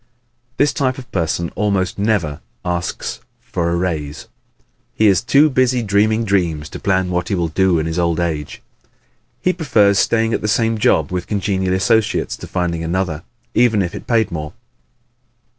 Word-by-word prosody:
This 145 Hz, +1 st, +3 dB
type 130 Hz, -4 st, 0 dB
of 130 Hz, -2 st, -11 dB
person 85 Hz, -1 st, -1 dB
almost 100 Hz, -2 st, 0 dB
never 100 Hz, -9 st, 0 dB, 0.2 s
asks 85 Hz, -1 st, -3 dB, 0.2 s
for 85 Hz, -1 st, -2 dB
a 85 Hz, -, 0 dB
raise. 80 Hz, -5 st, -3 dB, 0.7 s
He 110 Hz, -, +2 dB
is 95 Hz, -3 st, +4 dB
too 145 Hz, +2 st, +4 dB
busy 130 Hz, -3 st, +1 dB
dreaming 110 Hz, +2 st, +2 dB
dreams 85 Hz, -7 st, 0 dB
to -, -, -8 dB
plan 95 Hz, -2 st, 0 dB
what 90 Hz, 0 st, -1 dB
he 100 Hz, -, 0 dB
will 85 Hz, -2 st, -1 dB
do 95 Hz, +2 st, +2 dB
in 80 Hz, -, -1 dB
his 80 Hz, +2 st, -2 dB
old 85 Hz, -1 st, +1 dB
age. 80 Hz, -4 st, -3 dB, 0.8 s
He 185 Hz, -, +3 dB
prefers 105 Hz, -, +3 dB
staying 115 Hz, 0 st, +2 dB
at -, -, 0 dB
the 105 Hz, -, -2 dB
same 115 Hz, +1 st, +1 dB
job 80 Hz, -6 st, +2 dB
with 90 Hz, -1 st, -3 dB
congenial 95 Hz, -2 st, 0 dB
associates 110 Hz, +3 st, +1 dB
to -, -, -9 dB
finding 85 Hz, -2 st, -2 dB
another 85 Hz, -2 st, -2 dB, 0.3 s
even 115 Hz, -4 st, +3 dB
if 85 Hz, -, -4 dB
it -, -, -8 dB
paid 115 Hz, -3 st, +2 dB
more. 75 Hz, -2 st, -5 dB
95 Hz, 170 wpm, -18 LUFS, 85-110 Hz, 0.8 s, is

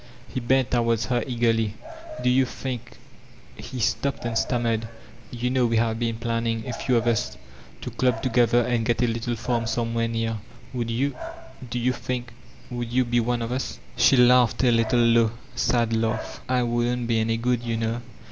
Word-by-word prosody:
He -, -, -1 dB
bent 130 Hz, +1 st, +2 dB
towards 115 Hz, -2 st, +2 dB
her 120 Hz, -2 st, 0 dB
eagerly: 115 Hz, -3 st, +1 dB, 0.5 s
''Do -, -, +1 dB
yon 130 Hz, -1 st, +4 dB
think— 125 Hz, -3 st, -6 dB, 0.6 s
he 130 Hz, -, -7 dB
stopped 120 Hz, +4 st, -1 dB
and 115 Hz, -1 st, -2 dB
stammered, 115 Hz, -1 st, 0 dB, 0.4 s
"You 125 Hz, +1 st, -2 dB
know 130 Hz, -2 st, +3 dB
we 115 Hz, 0 st, +1 dB
have 115 Hz, 0 st, +1 dB
been 115 Hz, -1 st, -1 dB
plan 115 Hz, 0 st, -2 dB
ning, 115 Hz, 0 st, -1 dB
a 125 Hz, -, -3 dB
few 125 Hz, +1 st, +1 dB
of 115 Hz, -, 0 dB
us, 105 Hz, -, 0 dB, 0.4 s
to -, -, -5 dB
dub 125 Hz, -3 st, 0 dB
together 120 Hz, -1 st, +3 dB
and 120 Hz, -1 st, 0 dB
get 120 Hz, +2 st, +1 dB
a -, -, +3 dB
little 115 Hz, +1 st, -2 dB
farm 115 Hz, 0 st, -1 dB
somewhere 115 Hz, 0 st, 0 dB
near— 115 Hz, -1 st, -2 dB, 0.3 s
would 120 Hz, -2 st, -2 dB
you— 130 Hz, +4 st, 0 dB, 0.5 s
do 120 Hz, -, -3 dB
you 125 Hz, +1 st, +1 dB
think— 120 Hz, -1 st, -4 dB, 0.4 s
would 120 Hz, -1 st, -4 dB
you 130 Hz, +1 st, +2 dB
be 120 Hz, 0 st, +2 dB
one 120 Hz, 0 st, 0 dB
of 115 Hz, -, -4 dB
ttt?*' 130 Hz, +1 st, -3 dB, 0.2 s
She 135 Hz, -, +5 dB
laughed, 125 Hz, 0 st, +5 dB
a 125 Hz, -, +5 dB
little 115 Hz, +1 st, +3 dB
low, 115 Hz, -1 st, +4 dB, 0.2 s
sad 115 Hz, -2 st, +1 dB
lai^: 110 Hz, 0 st, +1 dB, 0.3 s
''I 125 Hz, -1 st, +2 dB
wouldn't 120 Hz, +1 st, 0 dB
be 115 Hz, -1 st, +1 dB
any 115 Hz, +1 st, +1 dB
good, 120 Hz, 0 st, 0 dB
you 115 Hz, -1 st, -2 dB
know. 115 Hz, +1 st, -2 dB
120 Hz, 190 wpm, -25 LUFS, 115-125 Hz, 0.6 s, She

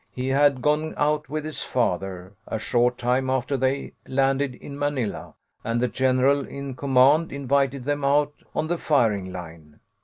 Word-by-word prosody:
He 130 Hz, +1 st, -3 dB
had 140 Hz, -1 st, +3 dB
gone 150 Hz, +1 st, +1 dB
out 150 Hz, -1 st, 0 dB
with 155 Hz, +1 st, -3 dB
his 155 Hz, -, -5 dB
father, 95 Hz, -5 st, -2 dB
a -, -, -2 dB
short 120 Hz, +2 st, +1 dB
time 125 Hz, +2 st, 0 dB
after 130 Hz, +1 st, 0 dB
they 130 Hz, +1 st, -1 dB
landed 135 Hz, 0 st, +1 dB
in 140 Hz, -, -10 dB
Manila, 145 Hz, -7 st, -2 dB, 0.3 s
and 115 Hz, +1 st, -1 dB
the 125 Hz, -, +2 dB
general 130 Hz, +3 st, +2 dB
in 140 Hz, -1 st, -6 dB
command 140 Hz, +4 st, +3 dB
invited 140 Hz, -1 st, 0 dB
them 145 Hz, 0 st, -1 dB
out 145 Hz, +1 st, +2 dB, 0.2 s
on -, -, 0 dB
the 170 Hz, +1 st, -2 dB
firing 105 Hz, -10 st, +1 dB
line. 80 Hz, -4 st, -10 dB
135 Hz, 160 wpm, -24 LUFS, 125-145 Hz, 0.3 s, had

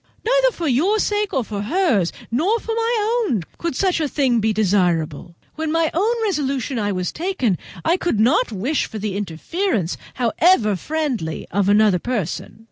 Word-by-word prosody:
Neither -, -, +4 dB
for 340 Hz, -7 st, -4 dB
your 320 Hz, -, +2 dB
sake 415 Hz, -1 st, 0 dB
nor 265 Hz, -, 0 dB
for 205 Hz, -2 st, -5 dB
hers, 230 Hz, -, +1 dB, 0.2 s
nor 360 Hz, -, +1 dB
for 450 Hz, -, -4 dB
my 460 Hz, 0 st, +1 dB
own, 210 Hz, -8 st, 0 dB, 0.2 s
could 335 Hz, -5 st, -2 dB
such 370 Hz, 0 st, +1 dB
a 310 Hz, -, 0 dB
thing 265 Hz, -5 st, +1 dB
be 220 Hz, 0 st, +1 dB
desirable. 175 Hz, -6 st, 0 dB, 0.2 s
When 315 Hz, 0 st, -3 dB
my 330 Hz, -1 st, +1 dB
own 425 Hz, +8 st, +1 dB
resolution 275 Hz, -, -1 dB, 0.2 s
was 180 Hz, 0 st, -2 dB
taken 315 Hz, -, -1 dB, 0.3 s
I 335 Hz, +3 st, +3 dB
could 345 Hz, -, -1 dB
not 240 Hz, +2 st, +3 dB
wish 235 Hz, +9 st, -1 dB
for 220 Hz, -, -7 dB
the 210 Hz, -2 st, -3 dB
interference, 200 Hz, -, -2 dB, 0.2 s
however 240 Hz, -, +3 dB
friendly, 255 Hz, -, -3 dB
of 200 Hz, +1 st, +1 dB
another 205 Hz, -3 st, +4 dB
person. 210 Hz, -2 st, -4 dB
260 Hz, 165 wpm, -21 LUFS, -, 0.3 s, Neither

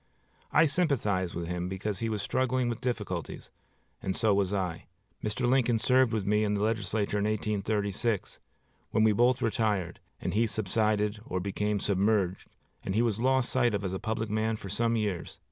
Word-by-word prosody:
I -, -, +6 dB
sympathized 125 Hz, -, +1 dB
with 85 Hz, 0 st, -3 dB
him 90 Hz, +1 st, -3 dB
because 95 Hz, +1 st, -3 dB
he 115 Hz, -, -1 dB
was 105 Hz, -2 st, -2 dB
struggling 130 Hz, 0 st, +1 dB
with 115 Hz, -, -4 dB
difficulties, 105 Hz, -, -4 dB, 0.5 s
and 95 Hz, -, -2 dB
so 110 Hz, -3 st, +2 dB
was 100 Hz, -1 st, +1 dB
I. 95 Hz, -4 st, -2 dB, 0.4 s
Mr. 110 Hz, +4 st, -1 dB
Lincoln 125 Hz, -2 st, +3 dB
served 125 Hz, +1 st, +3 dB
with 110 Hz, -4 st, -1 dB
me 105 Hz, +1 st, +2 dB
in 105 Hz, -1 st, +1 dB
the 100 Hz, -, 0 dB
legislature 105 Hz, -1 st, 0 dB
in 100 Hz, -, 0 dB
1836, 105 Hz, 0 st, -1 dB, 0.5 s
when 110 Hz, -, +2 dB
we 110 Hz, -, +5 dB
both 125 Hz, +4 st, +3 dB
retired; 105 Hz, -6 st, 0 dB, 0.2 s
and -, -, -3 dB
he 115 Hz, +3 st, +3 dB
subsided 105 Hz, 0 st, 0 dB
or 95 Hz, -4 st, -3 dB
became 100 Hz, +2 st, -1 dB
submerged, 100 Hz, -1 st, +1 dB, 0.3 s
and 95 Hz, -, -3 dB
he 115 Hz, -, +3 dB
was 115 Hz, -3 st, 0 dB
lost 130 Hz, +1 st, +2 dB
sight 120 Hz, -4 st, +2 dB
of 100 Hz, 0 st, -3 dB
as 95 Hz, -, -2 dB
a 95 Hz, -, -2 dB
public 110 Hz, -1 st, -2 dB
man 110 Hz, +1 st, 0 dB
for 100 Hz, -, -8 dB
some 115 Hz, +4 st, +1 dB
years. 105 Hz, -6 st, -2 dB
105 Hz, 180 wpm, -29 LUFS, 100-115 Hz, 0.5 s, I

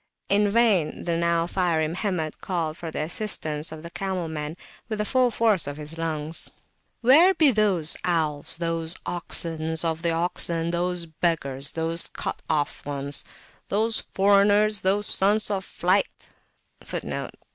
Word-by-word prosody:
In 205 Hz, +1 st, +2 dB
vain 205 Hz, -8 st, +1 dB
the 170 Hz, -1 st, -2 dB
now 170 Hz, 0 st, 0 dB
fiery 170 Hz, -3 st, 0 dB
Mohammed 170 Hz, -2 st, -3 dB
called 165 Hz, -4 st, -3 dB
for 165 Hz, 0 st, -7 dB
the 155 Hz, -, -3 dB
assistance 155 Hz, -4 st, -3 dB
of 160 Hz, 0 st, -9 dB
the 170 Hz, -, -9 dB
camel 185 Hz, -2 st, -4 dB
men 155 Hz, +1 st, -6 dB, 0.3 s
with 215 Hz, -, -3 dB
the 210 Hz, -, -2 dB
full 255 Hz, +2 st, +2 dB
force 220 Hz, -7 st, +1 dB
of 145 Hz, 0 st, -6 dB
his 150 Hz, +1 st, -8 dB
lungs: 160 Hz, -1 st, -1 dB, 0.5 s
"Where 315 Hz, +11 st, +5 dB
be 310 Hz, -4 st, +5 dB
those 200 Hz, -8 st, +2 dB
owls, 155 Hz, -5 st, 0 dB
those 165 Hz, 0 st, -1 dB
oxen 160 Hz, -2 st, 0 dB
of 165 Hz, -1 st, -2 dB
the 170 Hz, -, 0 dB
oxen, 165 Hz, 0 st, -1 dB
those 175 Hz, 0 st, -1 dB
beggars, 150 Hz, -4 st, +1 dB
those 165 Hz, +1 st, +1 dB
cut -, -, -6 dB
off 145 Hz, -1 st, -1 dB
ones, 140 Hz, 0 st, 0 dB, 0.5 s
those 220 Hz, +2 st, +1 dB
foreigners, 205 Hz, +1 st, +2 dB
those 200 Hz, +2 st, +1 dB
Sons 210 Hz, +3 st, +6 dB
of 195 Hz, -1 st, -2 dB
Flight[FN#13]? 185 Hz, +3 st, -4 dB
170 Hz, 145 wpm, -24 LUFS, 160-200 Hz, 0.5 s, Sons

